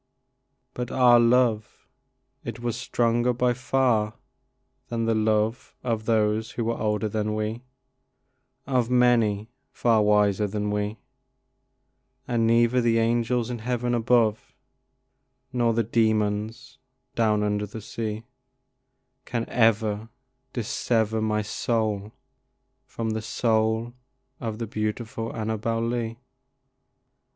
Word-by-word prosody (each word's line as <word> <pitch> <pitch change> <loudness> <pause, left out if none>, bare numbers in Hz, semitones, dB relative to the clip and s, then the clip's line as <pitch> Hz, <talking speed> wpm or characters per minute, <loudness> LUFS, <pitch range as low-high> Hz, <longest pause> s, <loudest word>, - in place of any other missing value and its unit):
But 125 0 -4
our 125 -2 +5
love 115 -2 +2 0.6
it - - -6
was 120 -1 -2
stronger 120 +1 +1
by 125 0 +1
far 120 -4 +1 0.7
than 115 -1 -2
the 115 - +2
love 110 +1 0
Of 115 -3 -2
those 110 -1 +1
that 120 - -1
were 115 +1 -1
older 105 -1 -1
than 105 0 -2
we, 110 +2 -3 1.0
Of 125 -3 +1
many 120 -4 +2 0.2
far 115 -3 +2
wiser 105 -1 +3
than 105 +1 -2
we, 105 +1 -2 1.3
And 115 -3 +1
neither 120 +2 +4
the 115 -1 +2
angels 120 +1 +1
in 120 - -4
heaven 120 +1 -1
above 115 -2 +1 1.0
Nor 120 -2 +2
the 115 - +2
demons 110 +2 -1 0.3
down 105 -2 +2
under 105 0 -1
the 105 +3 -8
sea 110 0 -5 1.0
Can 115 -1 -3
ever 110 -2 +2 0.4
dissever 110 -1 0
my 105 -1 0
soul 105 -1 -1 0.8
from 115 -1 -3
the 110 0 -2
soul 110 +1 0 0.5
Of 110 -3 -4
the 115 - -3
beautiful 110 +1 -3
Annabel 110 +1 -2
Lee. 115 -1 -2
115 Hz, 110 wpm, -25 LUFS, 110-120 Hz, 1.3 s, our